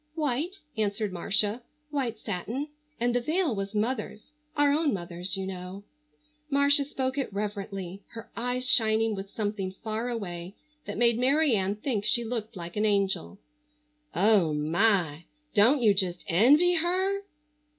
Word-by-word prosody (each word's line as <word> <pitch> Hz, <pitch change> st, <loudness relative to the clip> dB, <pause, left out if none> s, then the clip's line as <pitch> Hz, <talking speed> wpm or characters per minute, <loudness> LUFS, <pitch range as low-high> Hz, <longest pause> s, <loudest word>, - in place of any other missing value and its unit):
"White," 305 Hz, +4 st, -1 dB, 0.2 s
answered 210 Hz, -1 st, -1 dB
Marcia, 210 Hz, +5 st, 0 dB, 0.3 s
"white 255 Hz, -6 st, -1 dB
satin. 220 Hz, -, -4 dB, 0.3 s
And 240 Hz, +1 st, +1 dB
the 245 Hz, -, +2 dB
veil 320 Hz, +1 st, +1 dB
was 195 Hz, +1 st, -4 dB
mother's—our 285 Hz, +6 st, -1 dB
own 295 Hz, -4 st, +2 dB
mother's, 175 Hz, +1 st, -4 dB
you 190 Hz, -, -3 dB
know." 185 Hz, +1 st, -7 dB, 0.7 s
Marcia 280 Hz, 0 st, +4 dB
spoke 265 Hz, -1 st, -2 dB
it 270 Hz, -, -2 dB
reverently, 200 Hz, -2 st, -4 dB
her 225 Hz, -1 st, -9 dB
eyes 250 Hz, +2 st, -2 dB
shining 220 Hz, -2 st, +3 dB
with 195 Hz, -1 st, -6 dB
something 205 Hz, -3 st, -3 dB
far 220 Hz, +4 st, -4 dB
away 185 Hz, -5 st, -5 dB, 0.3 s
that 205 Hz, -, -4 dB
made 235 Hz, 0 st, +3 dB
Mary 275 Hz, +1 st, +3 dB
Ann 195 Hz, 0 st, 0 dB
think 215 Hz, -1 st, -2 dB
she 235 Hz, +2 st, +2 dB
looked 225 Hz, -1 st, -4 dB
like 170 Hz, -1 st, -7 dB
an 210 Hz, -, +1 dB
angel. 195 Hz, -, 0 dB, 0.8 s
"Oh, 185 Hz, -4 st, +4 dB
my! 165 Hz, 0 st, +1 dB, 0.3 s
Don't 245 Hz, +5 st, +5 dB
you 210 Hz, -3 st, +6 dB
just 180 Hz, -3 st, -1 dB
envy 290 Hz, -, +5 dB
her?" 375 Hz, +4 st, +1 dB
220 Hz, 140 wpm, -28 LUFS, 195-260 Hz, 0.8 s, you